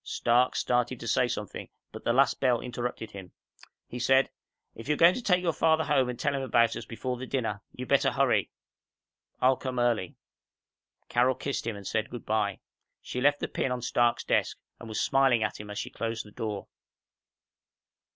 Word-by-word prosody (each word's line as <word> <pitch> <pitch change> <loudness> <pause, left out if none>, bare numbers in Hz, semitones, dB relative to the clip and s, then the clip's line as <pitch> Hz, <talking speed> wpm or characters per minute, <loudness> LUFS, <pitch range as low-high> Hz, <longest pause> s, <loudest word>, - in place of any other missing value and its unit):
Stark 120 +2 +2
started 125 0 0
to 115 - -7
say 125 - +3
something, 105 -4 -5 0.2
but - - -9
the - - +2
last 135 +2 +3
bell 125 -3 +3
interrupted 125 -2 -5
him. 95 -3 -10 0.5
He 125 - -7
said, 130 +2 +3 0.4
"If 115 - -10
you're 150 0 +1
going 170 +2 +7
to 250 - -4
take 180 -5 +2
your 170 -2 +1
father 160 +1 +3
home 130 -4 +2
and 125 - -5
tell - - 0
him 135 - -1
about 115 -3 +2
us 115 - -6
before 125 +3 -4
the 130 +1 -7
dinner, 115 -7 -2
you'd 125 0 -7
better 140 - +3
hurry. - - +2 0.9
I'll 130 0 +4
come 130 -2 -5
early." 120 -7 0 0.9
Carol 125 +2 +2
kissed 140 -3 -3
him 115 - -2
and 100 -1 -10
said 110 +2 -1
good 120 -2 -8
by. 105 -2 0 0.4
She 125 - -4
left 145 +2 +3
the - - -1
pin 130 - -2
on 125 -1 -3
Stark's 120 -1 +2
desk - - 0 0.2
and 115 - -9
was 110 - -3
smiling 135 -4 +3
at 110 - -3
him 105 0 -8
as 105 - -6
she - - -4
closed 115 -1 -4
the 105 - -14
door. 105 -2 -4
120 Hz, 195 wpm, -28 LUFS, 115-130 Hz, 0.9 s, going